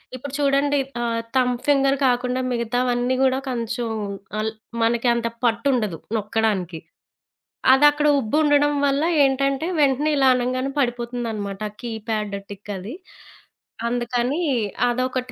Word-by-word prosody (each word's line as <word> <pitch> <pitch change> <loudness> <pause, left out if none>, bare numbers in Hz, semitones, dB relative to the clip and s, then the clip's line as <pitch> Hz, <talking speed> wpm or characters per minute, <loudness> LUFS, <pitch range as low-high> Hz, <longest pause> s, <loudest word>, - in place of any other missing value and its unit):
ఇప్పుడు 260 +2 -8
చూడండి 285 0 +2 0.2
ఆహ్, 230 -1 -1
థంబ్ 250 -1 +1
ఫింగర్ 275 -1 +3
కాకుండా 250 +1 0
మిగతావన్నీ 245 +1 0
కూడా 265 0 +2
కొంచెం 235 -1 -3 0.5
అల్ 220 +1 -1 0.3
మనకి 235 +2 +1
అంత 235 -1 -1 0.2
పట్టుండదు, 230 - +1 0.2
నొక్కడానికి. 205 -5 -1 0.9
అదక్కడ 295 +2 +4
ఉబ్బు 255 +3 -1
ఉండడం 290 0 +3
వల్ల 275 +2 +1 0.2
ఏంటంటే 275 +3 +1
వెంటనే 285 +2 +2
ఇలా 270 -1 +4
అనంగానే 255 +2 -1
పడిపోతుందన్నమాట, 235 -5 -2
ఆ 205 - -18
కీప్యాడ్ 220 -3 -3
టిక్ 205 +1 -8
అది 195 +7 -7 0.9
అందుకని 245 +5 -1 0.5
అదొకటి 255 +1 -1
245 Hz, 115 wpm, -22 LUFS, 230-275 Hz, 0.9 s, అదక్కడ